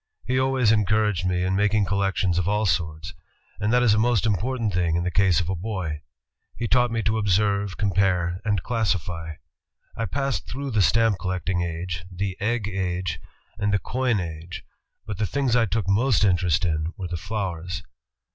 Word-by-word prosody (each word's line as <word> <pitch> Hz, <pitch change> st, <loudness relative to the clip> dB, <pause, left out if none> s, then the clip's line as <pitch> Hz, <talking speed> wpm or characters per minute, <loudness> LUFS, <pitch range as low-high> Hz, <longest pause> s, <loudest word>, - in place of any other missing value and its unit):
He 130 Hz, +1 st, +1 dB
always 130 Hz, -4 st, +3 dB
encouraged 105 Hz, -3 st, +2 dB
me 90 Hz, -1 st, 0 dB
in 95 Hz, +1 st, 0 dB
making 105 Hz, +1 st, +2 dB
collections 95 Hz, -2 st, +1 dB
of 90 Hz, -, -1 dB
all 105 Hz, +1 st, +1 dB
sorts, 80 Hz, -4 st, -1 dB, 0.5 s
and 105 Hz, +1 st, 0 dB
that 125 Hz, 0 st, +4 dB
is 115 Hz, -4 st, +5 dB
a 105 Hz, -, +3 dB
most 115 Hz, -2 st, +2 dB
important 110 Hz, +1 st, 0 dB
thing 85 Hz, -2 st, +1 dB
in 85 Hz, -, 0 dB
the 90 Hz, -, -1 dB
case 95 Hz, 0 st, +3 dB
of 90 Hz, -, -2 dB
a 95 Hz, -, 0 dB
boy. 90 Hz, -5 st, -4 dB, 0.5 s
He 115 Hz, -, -2 dB
taught 125 Hz, +1 st, +3 dB
me 115 Hz, -1 st, -1 dB
to 110 Hz, +2 st, +1 dB
observe, 100 Hz, -1 st, +1 dB
compare, 95 Hz, -3 st, +1 dB
and 105 Hz, -4 st, 0 dB
classify. 90 Hz, -8 st, -2 dB, 0.6 s
I 115 Hz, -, -2 dB
passed 135 Hz, +4 st, -2 dB
through 140 Hz, +2 st, -4 dB
the 110 Hz, -3 st, +2 dB
stamp 110 Hz, 0 st, +3 dB
collecting 90 Hz, -1 st, -1 dB
age, 85 Hz, -1 st, -4 dB
the 95 Hz, +1 st, -3 dB
egg 110 Hz, 0 st, 0 dB
age, 95 Hz, -2 st, -2 dB, 0.4 s
and 105 Hz, 0 st, +1 dB
the 100 Hz, -, +3 dB
coin 125 Hz, 0 st, 0 dB
age, 85 Hz, 0 st, -6 dB, 0.4 s
but 105 Hz, -2 st, -6 dB
the 105 Hz, -, +1 dB
things 135 Hz, -1 st, 0 dB
I 115 Hz, -2 st, +3 dB
took 100 Hz, 0 st, -1 dB
most 110 Hz, +3 st, +3 dB
interest 90 Hz, -2 st, +2 dB
in 80 Hz, 0 st, -1 dB
were 95 Hz, -3 st, -4 dB
the 85 Hz, -, -4 dB
flowers. 90 Hz, -2 st, -4 dB
100 Hz, 185 wpm, -24 LUFS, 90-110 Hz, 0.6 s, is